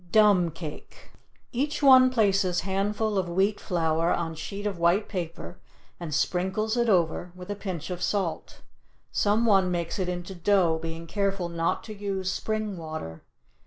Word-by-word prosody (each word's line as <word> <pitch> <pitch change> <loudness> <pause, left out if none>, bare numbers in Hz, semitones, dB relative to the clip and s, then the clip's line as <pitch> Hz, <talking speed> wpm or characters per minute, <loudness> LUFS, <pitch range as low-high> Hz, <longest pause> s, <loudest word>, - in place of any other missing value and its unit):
DUMB 205 -5 +5
CAKE 155 -4 -9 0.4
Each 290 +4 -2
one 260 -2 +8
places 195 -7 +2
handful 200 +2 0
of 180 -2 -2
wheat 195 +4 +1
flour 165 -1 0
on 165 -1 -1
sheet 200 +6 -6
of 200 -4 -2
white 175 +5 +3
paper 175 -2 -6 0.4
and 170 -3 -6
sprinkles 190 +8 0
it 235 -1 +1
over 175 -2 +1
with 180 +2 -8
a - - -2
pinch 185 -5 -5
of 180 0 -5
salt. 190 -4 -2 0.5
Some 210 +3 +2
one 195 -4 +4
makes 175 +1 -2
it 180 -1 -1
into 180 +1 -5
dough, 175 -3 +2
being 165 0 -6
careful 195 0 -1
not 170 0 -1
to 215 - -8
use 195 -2 -3
spring 215 -2 -3
water. 155 - -7
190 Hz, 160 wpm, -27 LUFS, 170-205 Hz, 0.5 s, one